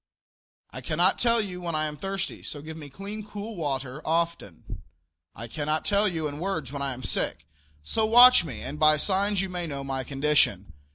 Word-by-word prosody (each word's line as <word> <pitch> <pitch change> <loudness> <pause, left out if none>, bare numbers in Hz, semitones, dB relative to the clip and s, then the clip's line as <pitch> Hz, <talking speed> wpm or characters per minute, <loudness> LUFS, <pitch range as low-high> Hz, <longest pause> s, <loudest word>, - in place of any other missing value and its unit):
I - - -7
cannot - - +2
tell 235 -1 +3
you 185 -4 -4
when 170 -2 -3
I 155 0 +1
am 150 -1 -4
thirsty, 195 +4 -4
so 145 -1 -7
give 160 +1 -8
me 150 -3 -9
clean, 200 +8 -7
cool 210 +1 -7
water 135 -4 -3
often. 165 - -3 0.5
I 115 - -7
cannot 155 +5 -2
tell 205 +1 +3
you 165 -5 -1
in 145 0 -7
words 160 -8 -3
when 140 -1 -5
I 140 -1 -2
am 130 +1 -10
sick, 80 -7 -1 0.4
so 220 - 0
watch 245 -1 +8
me 155 -6 -7
and 150 - -6
by 155 0 +5
signs 195 +4 +1
you 195 - -3
may 175 -2 -4
know 140 -2 -5
my 135 -1 -3
condition. 135 - +1
155 Hz, 195 wpm, -26 LUFS, 140-195 Hz, 0.5 s, watch